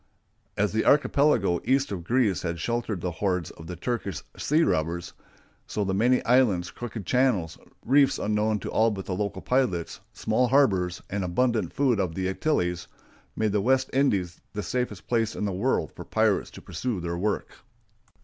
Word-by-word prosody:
As 105 Hz, -2 st, +1 dB
the 110 Hz, -, +1 dB
archipelago 140 Hz, -, +3 dB
east 135 Hz, +1 st, +1 dB
of 90 Hz, -4 st, -4 dB
Greece 115 Hz, -2 st, +1 dB
had 85 Hz, -1 st, -3 dB
sheltered 115 Hz, -1 st, -2 dB
the 90 Hz, -, -2 dB
hordes 90 Hz, -1 st, -1 dB
of 80 Hz, -, -12 dB
the 90 Hz, -, -5 dB
Turkish 100 Hz, -1 st, -3 dB
sea 155 Hz, +3 st, +2 dB
robbers, 85 Hz, -, -1 dB, 0.5 s
so 105 Hz, -, -2 dB
the 95 Hz, -1 st, -1 dB
many 120 Hz, +6 st, +2 dB
islands, 110 Hz, -9 st, +3 dB
crooked 115 Hz, -4 st, -7 dB
channels, 120 Hz, -11 st, +1 dB, 0.3 s
reefs 140 Hz, +2 st, +4 dB
unknown 105 Hz, +1 st, 0 dB
to -, -, -5 dB
all 110 Hz, +1 st, +3 dB
but 95 Hz, -3 st, -5 dB
the 95 Hz, -, -3 dB
local 100 Hz, +1 st, -3 dB
pilots, 125 Hz, -11 st, 0 dB
small 115 Hz, +3 st, +1 dB
harbors, 95 Hz, -10 st, +2 dB
and 100 Hz, 0 st, -1 dB
abundant 110 Hz, +1 st, 0 dB
food 130 Hz, -6 st, +1 dB
of 90 Hz, -4 st, -1 dB
the 95 Hz, -1 st, -1 dB
Antilles, 90 Hz, -, -1 dB, 0.5 s
made 110 Hz, -1 st, 0 dB
the 105 Hz, 0 st, +1 dB
West 130 Hz, +4 st, +2 dB
Indies 100 Hz, -11 st, +1 dB
the 105 Hz, 0 st, -3 dB
safest 115 Hz, -9 st, -3 dB
place 115 Hz, -2 st, 0 dB
in -, -, -2 dB
the 100 Hz, -, -1 dB
world 90 Hz, -, 0 dB
for -, -, -8 dB
pirates -, -, +1 dB
to -, -, -13 dB
pursue 95 Hz, +5 st, -3 dB
their 85 Hz, 0 st, -3 dB
work. 100 Hz, +5 st, -2 dB
105 Hz, 175 wpm, -26 LUFS, 90-125 Hz, 0.5 s, reefs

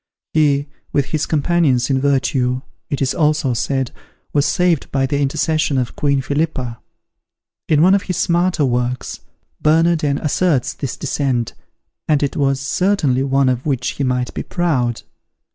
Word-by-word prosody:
He, 145 Hz, -2 st, +2 dB, 0.2 s
with 140 Hz, -3 st, +1 dB
his 155 Hz, -, 0 dB
companions 145 Hz, -5 st, +2 dB
in 130 Hz, -1 st, +1 dB
virtue, 130 Hz, -2 st, +1 dB, 0.3 s
it 140 Hz, -1 st, -1 dB
is 130 Hz, -, 0 dB
also 150 Hz, -4 st, +1 dB
said, 130 Hz, +2 st, -1 dB, 0.4 s
was 145 Hz, -1 st, +2 dB
saved 175 Hz, -4 st, +1 dB
by 135 Hz, -1 st, +1 dB
the 140 Hz, +2 st, -1 dB
intercession 150 Hz, +1 st, 0 dB
of 125 Hz, -2 st, -2 dB
Queen 140 Hz, -2 st, +1 dB
Philippa. 140 Hz, -5 st, -2 dB, 0.9 s
In 155 Hz, 0 st, +4 dB
one 185 Hz, +2 st, +6 dB
of 200 Hz, -, +3 dB
his 180 Hz, -3 st, -3 dB
smaller 175 Hz, -2 st, +2 dB
works, 125 Hz, 0 st, -2 dB, 0.4 s
Bernardin 155 Hz, -2 st, +3 dB
asserts 150 Hz, -3 st, +1 dB
this 135 Hz, -4 st, -5 dB
descent, 125 Hz, -5 st, -1 dB, 0.5 s
and 150 Hz, -2 st, +2 dB
it 140 Hz, -, -1 dB
was 135 Hz, -2 st, +1 dB
certainly 145 Hz, -3 st, +1 dB
one 135 Hz, 0 st, +2 dB
of 125 Hz, +2 st, -1 dB
which 130 Hz, -4 st, 0 dB
he 140 Hz, -, -3 dB
might 125 Hz, -2 st, -1 dB
be -, -, -3 dB
proud. 130 Hz, -10 st, -1 dB
140 Hz, 150 wpm, -19 LUFS, 130-155 Hz, 0.9 s, one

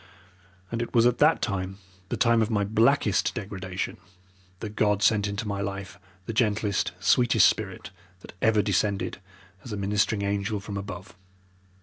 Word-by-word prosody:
And 115 Hz, 0 st, -2 dB
it 120 Hz, -, -5 dB
was 115 Hz, 0 st, +5 dB
at 120 Hz, 0 st, +2 dB
that 150 Hz, +2 st, +4 dB
time, 95 Hz, -1 st, -2 dB, 0.3 s
the -, -, -2 dB
time 115 Hz, -1 st, +4 dB
of 110 Hz, -, +1 dB
my 105 Hz, -3 st, +1 dB
blackest 110 Hz, +1 st, +2 dB
degradation, 95 Hz, -4 st, -5 dB, 0.6 s
that 105 Hz, -1 st, -7 dB
God 105 Hz, -1 st, +2 dB
sent 105 Hz, -2 st, +3 dB
into 100 Hz, +2 st, -4 dB
my 100 Hz, -1 st, -2 dB
life 100 Hz, -1 st, -5 dB, 0.3 s
the 115 Hz, -, -4 dB
gentlest, 105 Hz, -3 st, +1 dB
sweetest 115 Hz, -1 st, +5 dB
spirit 100 Hz, -3 st, -3 dB, 0.3 s
that -, -, -12 dB
ever 110 Hz, -2 st, +3 dB
descended 100 Hz, 0 st, 0 dB, 0.4 s
as 120 Hz, -, -9 dB
a 105 Hz, -, -3 dB
ministering 100 Hz, +1 st, 0 dB
angel 100 Hz, +1 st, -1 dB
from 100 Hz, 0 st, -7 dB
above. 100 Hz, -1 st, -7 dB
105 Hz, 155 wpm, -26 LUFS, 100-110 Hz, 0.6 s, was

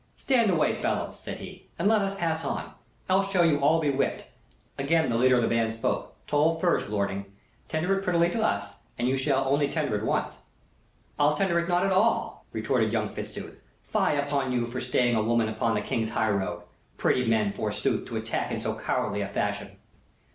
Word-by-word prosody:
"Stand 240 Hz, -5 st, +2 dB
away, 170 Hz, -4 st, +1 dB
fellows," -, -, -2 dB
said -, -, -6 dB
he, -, -, -11 dB
"and 170 Hz, -, +1 dB
let 215 Hz, -1 st, +4 dB
us 195 Hz, 0 st, -1 dB
pass 165 Hz, -3 st, -1 dB
on. -, -, -3 dB, 0.4 s
Else 195 Hz, +1 st, +2 dB
shall 185 Hz, -3 st, +3 dB
you 150 Hz, -3 st, +3 dB
all 150 Hz, +4 st, +4 dB
be 150 Hz, -3 st, +1 dB
whipped." 140 Hz, -, -2 dB, 0.5 s
Again 160 Hz, 0 st, +2 dB
the -, -, 0 dB
leader 130 Hz, +2 st, +4 dB
of 120 Hz, -, +2 dB
the -, -, +2 dB
band 115 Hz, -1 st, +1 dB
spoke. 115 Hz, -, -2 dB
"Toll 155 Hz, +3 st, +2 dB
first, 175 Hz, -, +1 dB
lording; 100 Hz, -1 st, -2 dB, 0.4 s
tender 175 Hz, +5 st, 0 dB
it -, -, -7 dB
prettily 170 Hz, -2 st, +3 dB
to 225 Hz, -, -1 dB
us, 100 Hz, -, 0 dB, 0.2 s
and 120 Hz, -, 0 dB
you 130 Hz, -, +2 dB
shall 135 Hz, 0 st, +1 dB
only 145 Hz, +1 st, +2 dB
tender 150 Hz, -9 st, -1 dB
it 105 Hz, -, -2 dB
once." -, -, -1 dB, 0.8 s
"I'll 145 Hz, +1 st, +4 dB
tender 175 Hz, -1 st, +2 dB
it 170 Hz, +1 st, -2 dB
not 175 Hz, +2 st, +2 dB
at 195 Hz, -, +1 dB
all," 210 Hz, +5 st, +1 dB
retorted -, -, 0 dB
young -, -, 0 dB
Fitzooth. -, -, -8 dB, 0.2 s
"Fie 195 Hz, -8 st, +1 dB
upon 140 Hz, -2 st, 0 dB
you 120 Hz, -1 st, +1 dB
for 120 Hz, +2 st, -5 dB
staying 125 Hz, -1 st, +2 dB
a 110 Hz, -, +2 dB
woman 115 Hz, 0 st, +2 dB
upon 110 Hz, +1 st, 0 dB
the 105 Hz, -, 0 dB
King's 115 Hz, 0 st, -1 dB
highroad! 100 Hz, -6 st, -1 dB, 0.3 s
Pretty 125 Hz, -1 st, +1 dB
men, 110 Hz, -3 st, +2 dB
forsooth, -, -, -2 dB
to -, -, -4 dB
attack -, -, -2 dB
in -, -, -2 dB
so -, -, -2 dB
cowardly 100 Hz, 0 st, -1 dB
a 100 Hz, -, -2 dB
fashion!" 100 Hz, -, -3 dB
140 Hz, 200 wpm, -27 LUFS, 115-170 Hz, 0.8 s, let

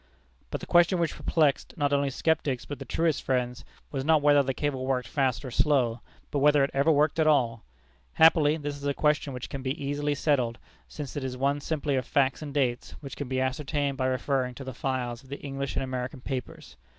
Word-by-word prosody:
But -, -, -4 dB
the -, -, -6 dB
question 175 Hz, +2 st, +4 dB
which 170 Hz, -2 st, 0 dB
perplexed 150 Hz, -5 st, +1 dB
not 145 Hz, -1 st, +1 dB
only 140 Hz, 0 st, +2 dB
skeptics, 140 Hz, -2 st, 0 dB
but 145 Hz, -, -7 dB
the 135 Hz, -, -7 dB
truest 165 Hz, +4 st, 0 dB
friends, 125 Hz, -2 st, -1 dB, 0.3 s
was 135 Hz, -2 st, -2 dB
not 155 Hz, 0 st, +3 dB
whether 145 Hz, -1 st, +6 dB
the 135 Hz, -1 st, -1 dB
cable 130 Hz, -1 st, -2 dB
worked 125 Hz, -3 st, 0 dB
fast 130 Hz, -4 st, 0 dB
or 130 Hz, -, -6 dB
slow, 125 Hz, -4 st, +2 dB, 0.3 s
but 145 Hz, -, 0 dB
whether 145 Hz, 0 st, +5 dB
it 135 Hz, -, 0 dB
ever 140 Hz, +4 st, +3 dB
worked 150 Hz, +2 st, +2 dB
at 155 Hz, -, +3 dB
all. 120 Hz, -7 st, +2 dB, 0.5 s
Happily, 160 Hz, -1 st, +5 dB
this 145 Hz, -2 st, -4 dB
is 145 Hz, 0 st, -5 dB
a 140 Hz, -, 0 dB
question 150 Hz, -1 st, +1 dB
which 125 Hz, -1 st, -6 dB
can 135 Hz, -1 st, -6 dB
easily 145 Hz, +2 st, -1 dB
be -, -, -4 dB
settled, 130 Hz, -6 st, +1 dB, 0.3 s
since 145 Hz, -3 st, -7 dB
it 145 Hz, -, -3 dB
is 130 Hz, -1 st, -4 dB
one 140 Hz, +2 st, 0 dB
simply 145 Hz, -2 st, -1 dB
of 130 Hz, -, -2 dB
facts 135 Hz, 0 st, +1 dB
and 150 Hz, -2 st, -6 dB
dates, 130 Hz, -4 st, -1 dB
which 140 Hz, -2 st, -8 dB
can 145 Hz, -, -5 dB
be 130 Hz, 0 st, -1 dB
ascertained 140 Hz, +1 st, -1 dB
by 130 Hz, -, +1 dB
referring 130 Hz, 0 st, -1 dB
to 135 Hz, -, -8 dB
the 130 Hz, -1 st, -6 dB
files 125 Hz, -2 st, -3 dB
of 135 Hz, -, -19 dB
the 140 Hz, -, -5 dB
English 140 Hz, -1 st, -4 dB
and -, -, 0 dB
American 130 Hz, +1 st, -4 dB
papers. 125 Hz, -, -6 dB
140 Hz, 220 wpm, -27 LUFS, 130-145 Hz, 0.5 s, whether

